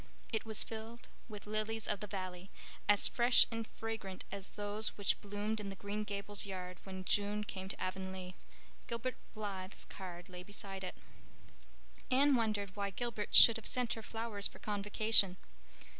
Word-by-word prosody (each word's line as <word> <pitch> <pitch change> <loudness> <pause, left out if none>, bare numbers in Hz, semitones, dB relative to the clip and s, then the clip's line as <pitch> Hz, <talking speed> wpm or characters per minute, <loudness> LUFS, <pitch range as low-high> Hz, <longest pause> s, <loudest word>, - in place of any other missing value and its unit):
It 220 - 0
was 220 -2 +3
filled 225 +1 -8 0.2
with 210 -2 -8
lilies 215 +1 -2
of 205 - 0
the 210 - -6
valley, 185 -2 -6 0.4
as 205 -1 +6
fresh 240 +1 +6
and 225 -1 -3
fragrant 220 -4 -6
as 200 -1 -6
those 210 +1 0
which 205 -1 +1
bloomed 205 +2 -2
in 205 -1 -5
the 195 - -6
Green 205 +2 -4
Gables 205 0 -1
yard 180 -2 -5
when 190 -1 -6
June 205 +1 +1
came 190 -2 -6
to - - -4
Avonlea. 185 0 -4 0.5
Gilbert 235 +1 -3 0.2
Blythe's 195 -3 -5
card 180 -2 -8
lay 180 -1 -8
beside 195 0 -6
it. 180 - -5 1.1
Anne 280 +2 +5
wondered 210 -5 0
why 200 -1 -1
Gilbert 215 +1 -3
should 230 -1 +10
have 225 - -4
sent 250 -2 +1
her 225 - -6
flowers 225 -2 +1
for - - -14
Convocation. 205 -2 +4
205 Hz, 160 wpm, -35 LUFS, 190-220 Hz, 1.1 s, should